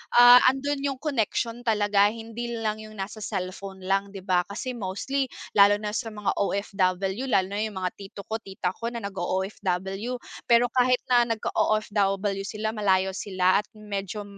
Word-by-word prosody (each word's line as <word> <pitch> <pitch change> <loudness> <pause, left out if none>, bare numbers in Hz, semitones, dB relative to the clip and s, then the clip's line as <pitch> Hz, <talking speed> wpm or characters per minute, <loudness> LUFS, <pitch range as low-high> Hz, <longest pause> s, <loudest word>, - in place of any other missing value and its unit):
ah, 245 +1 +10
andun 275 +2 +1
yung 275 -1 -1
connection 240 -4 -1
talaga, 205 -3 +3
hindi 230 +2 -5
lang 220 -1 -2
yung 215 0 -10
nasa 205 +2 -6
cellphone 190 0 -5
lang, 195 +1 -1
'di 190 - -7
ba. 180 -2 +1
Kasi 235 +6 -4
mostly 245 +6 -2 0.2
lalo 205 0 +6
na 210 0 -4
sa 225 +1 -3
mga 210 -2 -2
OFW, 195 +3 0
lalo 190 -6 +2
na 205 - -2
yung 210 -4 -3
mga 180 - 0
tito 200 0 -9
ko, 220 - -1
tita 190 -3 -3
ko 230 +4 -5
na 235 -2 -5
nag-o-OFW, 195 +3 -2 0.3
pero 235 0 +4
kahit 250 0 +3
na 240 -1 +5
nag-o-OFW 200 -2 0
sila, 215 0 -3
malayo 190 -3 +2
sila 185 -1 +1
at 210 - -6
medyo 205 -1 -5
210 Hz, 165 wpm, -26 LUFS, 195-230 Hz, 0.3 s, ah